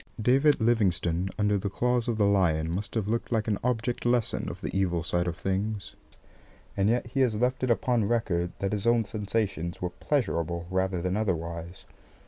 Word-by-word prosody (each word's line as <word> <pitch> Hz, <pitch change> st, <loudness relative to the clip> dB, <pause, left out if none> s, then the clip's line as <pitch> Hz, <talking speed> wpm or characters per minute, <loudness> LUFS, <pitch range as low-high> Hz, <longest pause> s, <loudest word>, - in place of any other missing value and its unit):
David 135 Hz, +6 st, +4 dB
Livingstone 95 Hz, -6 st, +1 dB
under 105 Hz, -1 st, +2 dB
the 100 Hz, -, -2 dB
claws 125 Hz, +3 st, 0 dB
of 115 Hz, -2 st, 0 dB
the 105 Hz, -, +3 dB
lion 85 Hz, -5 st, +2 dB
must 100 Hz, +5 st, -4 dB
have 110 Hz, -3 st, 0 dB
looked 115 Hz, +3 st, -2 dB
like 110 Hz, -2 st, 0 dB
an 105 Hz, -3 st, 0 dB
object 120 Hz, 0 st, -1 dB
lesson 120 Hz, -2 st, +1 dB
of -, -, -7 dB
the -, -, -5 dB
evil 90 Hz, -3 st, +1 dB
side 85 Hz, +2 st, 0 dB
of 85 Hz, 0 st, -3 dB
things, 100 Hz, +1 st, -2 dB, 0.8 s
and 100 Hz, +1 st, +2 dB
yet 120 Hz, +2 st, +1 dB
he 120 Hz, +4 st, -3 dB
has 125 Hz, -5 st, +3 dB
left 125 Hz, +4 st, 0 dB
it 130 Hz, -, 0 dB
upon 120 Hz, -1 st, +2 dB
record 100 Hz, -6 st, 0 dB
that 100 Hz, +1 st, -2 dB
his 105 Hz, +2 st, -1 dB
own 115 Hz, -1 st, +4 dB
sensations 100 Hz, -5 st, -2 dB
were 90 Hz, 0 st, -3 dB
pleasurable 85 Hz, -, -1 dB
rather 95 Hz, -1 st, 0 dB
than 90 Hz, +1 st, 0 dB
otherwise. 85 Hz, -4 st, -3 dB
100 Hz, 185 wpm, -28 LUFS, 90-115 Hz, 0.8 s, David